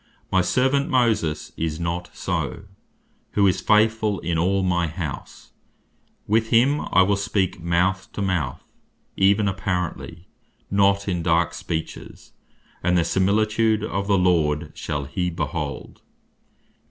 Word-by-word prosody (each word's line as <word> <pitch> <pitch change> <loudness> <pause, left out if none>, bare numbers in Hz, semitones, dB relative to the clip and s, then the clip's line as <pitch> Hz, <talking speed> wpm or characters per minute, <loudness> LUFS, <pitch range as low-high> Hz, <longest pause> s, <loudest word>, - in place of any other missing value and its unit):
My 95 - +4
servant 130 +8 +1
Moses 110 -11 +1
is 80 0 -3
not 85 +1 -3
so, - - -3 0.7
who 100 - +3
is 95 - +2
faithfull 110 -1 +2
in 85 0 -2
all 95 +4 +1
my 90 -2 +1
house; 80 -3 -7 0.7
with 110 +2 +1
him 135 +6 +3
I 95 - +6
will 100 +2 +2
speak 95 -3 -1
mouth 90 +2 0
to - - -4
mouth, 85 -9 -2 0.5
even 100 +2 +3
apparently, 90 -3 -3 0.4
not 100 0 +3
in 90 -3 -1
dark 85 0 +1
speeches; 80 -1 -6 0.5
and 90 0 +2
the 85 - +2
similitude 110 +4 +1
of 100 -2 -3
the 100 -1 +3
Lord 80 -4 +1
shall 75 -1 -4
he 90 +5 -2
behold." 75 -4 -5
95 Hz, 130 wpm, -23 LUFS, 85-105 Hz, 0.7 s, I